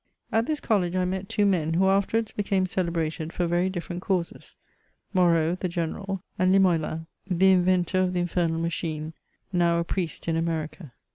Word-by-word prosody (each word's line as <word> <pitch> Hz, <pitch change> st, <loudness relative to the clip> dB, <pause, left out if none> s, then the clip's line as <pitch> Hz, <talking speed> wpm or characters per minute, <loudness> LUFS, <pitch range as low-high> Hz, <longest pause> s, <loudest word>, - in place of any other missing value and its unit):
At 225 Hz, +1 st, +1 dB
this 305 Hz, -1 st, -1 dB
college 185 Hz, -6 st, 0 dB
I 185 Hz, 0 st, +1 dB
met 190 Hz, +1 st, -3 dB
two 205 Hz, -, +2 dB
men, 165 Hz, -5 st, +1 dB
who 190 Hz, +2 st, +3 dB
afterwards 200 Hz, +3 st, +1 dB
hecame 195 Hz, -2 st, +1 dB
celebrated 165 Hz, -3 st, -2 dB
for 175 Hz, -, -1 dB
very 175 Hz, +2 st, +1 dB
different 175 Hz, -1 st, -5 dB
causes: 185 Hz, -4 st, -3 dB, 0.6 s
Moreau, 170 Hz, -3 st, +3 dB
the 185 Hz, 0 st, -3 dB
General, 180 Hz, +3 st, -3 dB, 0.2 s
and 185 Hz, 0 st, +4 dB
Limoelan, 165 Hz, -4 st, +2 dB, 0.2 s
the 190 Hz, +1 st, +4 dB
inventor 185 Hz, 0 st, +3 dB
of 185 Hz, -1 st, +1 dB
the 180 Hz, -, 0 dB
Infernal 170 Hz, -2 st, 0 dB
Machine, 160 Hz, -2 st, -3 dB, 0.4 s
now 170 Hz, -1 st, +3 dB
a 170 Hz, -, +1 dB
Priest 170 Hz, -2 st, -3 dB
in 165 Hz, -, +1 dB
America. 160 Hz, -3 st, -3 dB
180 Hz, 165 wpm, -26 LUFS, 165-190 Hz, 0.6 s, and